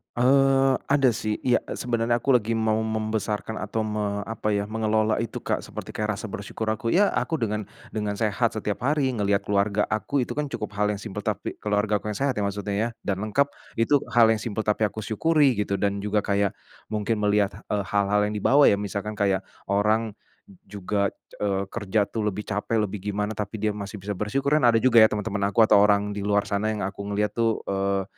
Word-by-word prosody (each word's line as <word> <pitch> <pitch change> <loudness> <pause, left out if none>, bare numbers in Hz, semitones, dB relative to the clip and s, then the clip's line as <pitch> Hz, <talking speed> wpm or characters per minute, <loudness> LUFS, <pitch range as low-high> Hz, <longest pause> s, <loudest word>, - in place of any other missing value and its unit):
Eee, 135 +1 +4 0.2
ada 140 -2 +4
sih 110 -1 -2
iya 125 -2 +1
sebenarnya 120 -1 0
aku 135 +2 +3
lagi 115 -2 +1
mau 110 -1 +1
membesarkan 110 0 -2
atau 105 +2 -3
me 105 -1 -1
apa 105 -1 -2
ya, 100 0 0
mengelola 110 0 +1
itu, 115 - -5
Kak, - - -2
seperti - - -8
kayak 105 -2 -2
rasa - - -5
bersyukur 100 +2 -5
aku 115 +2 -1
iya 200 +3 +5
aku 160 -2 -1
dengan 105 -2 -1 0.3
dengan 105 -1 -2
sehat 110 +1 +1
setiap 105 +1 -4
hari 145 0 +2
ngelihat 100 -2 +1
keluarga 100 +1 +1
aku 110 +6 -1
itu 125 - -2
kan 145 -1 -2
cukup 105 -1 -5
hal 105 0 +1
yang 100 - -4
simpel 105 0 -6
tapi 105 -2 -3
keluargaku 105 0 0
yang 105 - -5
sehat 135 -2 +1
ya 105 - -1
maksudnya 100 0 -2
ya 110 +3 0 0.2
dan 100 0 -1
lengkap 140 +7 0 0.2
itu 135 +5 +3
hal 115 -1 +6
yang 110 -1 +2
simpel 110 -2 -3
tapi 105 +1 +1
aku 110 +1 -1
syukuri 140 +5 +2
gitu 100 -1 -1
dan 100 -1 -1
juga 105 0 +1
kayak, 100 -1 +1 0.4
mungkin 110 +1 0
melihat, 105 -1 0
eee, 105 -1 0
hal-hal 105 +1 +2
yang 105 - -4
dibawa 135 +7 +5
ya - - +5
misalkan 100 +1 -4
kayak 100 -2 +1 0.3
orang, 105 +2 +2 0.6
juga, 100 0 -1 0.3
eee, 100 -1 0
kerja 105 -1 0
tuh 105 +1 -3
lebih 105 +1 -3
capek 110 +2 -1
lebih 105 0 -4
gimana 105 +1 -1
tapi 105 0 -4
dia 105 0 0
masih 105 0 -6
bisa 105 +2 -4
bersyukur 105 +8 -1
dan 135 -5 +4
ada 115 - +5
juga 125 -3 +6
ya 110 - +9
teman-teman 100 -1 -2
aku 105 +3 +4
atau 105 -2 +6
orang 105 0 +3
di 105 - -4
luar 100 0 +2
sana 100 +1 -1
yang 105 - -4
aku 100 +1 -5
ngelihat 105 0 0
tuh, 115 -1 0
eee, 100 0 0
105 Hz, 205 wpm, -25 LUFS, 100-115 Hz, 0.6 s, ya